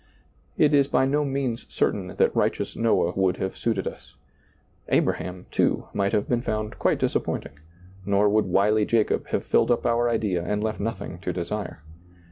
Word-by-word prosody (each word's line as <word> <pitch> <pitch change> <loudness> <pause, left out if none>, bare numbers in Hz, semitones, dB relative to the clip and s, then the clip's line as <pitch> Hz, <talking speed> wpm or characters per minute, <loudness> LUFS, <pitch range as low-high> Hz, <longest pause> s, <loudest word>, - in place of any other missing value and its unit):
It 150 -1 +4
is 140 -1 +4
by 130 - +2
no 145 +2 +1
means 135 -4 -2
certain - - 0
that - - +2
righteous - - 0
Noah 115 -6 +2
would 95 -1 +1
have 95 - -3
suited 110 -5 -1
us. - - -9 0.7
Abraham, 90 0 0
too, - - +1
might 100 0 0
have 105 - 0
been 120 -1 +1
found 110 -2 -3
quite - - +2
disappointing, 70 - -2 0.4
nor 100 +2 +2
would 105 +1 +3
wily 105 +3 +3
Jacob 110 0 +1
have - - -2
filled - - +2
up 120 - +1
our 120 0 +2
idea 105 -7 0
and 105 +3 -1
left 110 0 -2
nothing 100 -5 -4
to 90 0 -3
desire. 90 -1 -5
105 Hz, 170 wpm, -25 LUFS, 95-115 Hz, 0.7 s, It